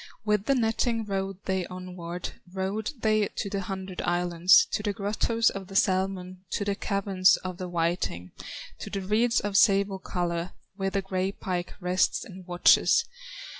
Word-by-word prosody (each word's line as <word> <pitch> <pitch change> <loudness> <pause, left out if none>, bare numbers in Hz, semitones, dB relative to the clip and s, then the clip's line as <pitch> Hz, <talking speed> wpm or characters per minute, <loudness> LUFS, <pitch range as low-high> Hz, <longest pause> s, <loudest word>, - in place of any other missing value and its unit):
With 210 -1 +1
the 275 - +3
netting 225 -1 0
rowed 195 -1 -4
they 190 -2 -1
onward, 180 -1 -6 0.2
Rowed 195 +3 -2
they 215 -2 +2
to 200 - -3
the 200 - -1
hundred 190 -1 -5
islands, 175 +1 +4
To - - -1
the 205 -1 -1
grottoes 215 +3 +1
of 195 -1 -7
the 195 - -10
salmon, 185 -1 0
To 200 - -1
the 200 - +1
caverns 195 -2 +2
of 185 -1 -5
the 180 -1 -4
whiting, 165 - -2 0.5
To - - -6
the 195 - -3
reeds 220 +5 +2
of 205 -1 -3
sable 200 -2 +4
color, 175 -1 -3 0.2
Where 195 -1 -1
the 195 0 -1
gray 190 0 -1
pike 180 -3 -4
rests 180 0 +1
and 185 -1 -11
watches. 175 0 +4
190 Hz, 165 wpm, -27 LUFS, 180-200 Hz, 0.5 s, islands